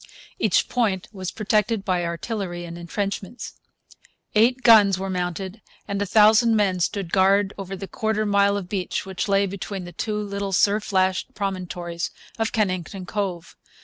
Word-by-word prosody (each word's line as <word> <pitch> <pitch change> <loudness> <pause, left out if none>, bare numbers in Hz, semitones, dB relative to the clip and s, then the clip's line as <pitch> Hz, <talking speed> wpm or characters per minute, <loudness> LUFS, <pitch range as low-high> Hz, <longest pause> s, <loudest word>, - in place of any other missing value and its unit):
Each 215 -5 +2
point 215 -5 0
was 190 -3 -5
protected 215 -1 0
by 180 -2 +1
artillery 175 0 -4
and 170 0 -8
entrenchments. 195 +5 -4 0.8
Eight 245 +4 +3
guns 205 -5 +7
were 190 0 -3
mounted 185 +3 -3 0.3
and 200 0 -2
a 205 - -1
thousand 220 +3 +5
men 195 -4 +2
stood 180 0 -1
guard 195 +1 +3
over 195 -1 -6
the 195 +1 -7
quarter 220 +1 -1
mile 200 0 +3
of 195 -3 -5
beach 185 -2 -3
which 190 +1 -3
lay 200 0 +3
between 195 0 -5
the 175 - -8
two 210 +3 -3
little 200 -1 -3
surf 205 +3 +2
lashed 185 -1 +1
promontories 180 -3 -3 0.3
of 225 - 0
Kennington 185 -3 -2
Cove. 185 -3 -4
195 Hz, 155 wpm, -23 LUFS, 185-210 Hz, 0.8 s, guns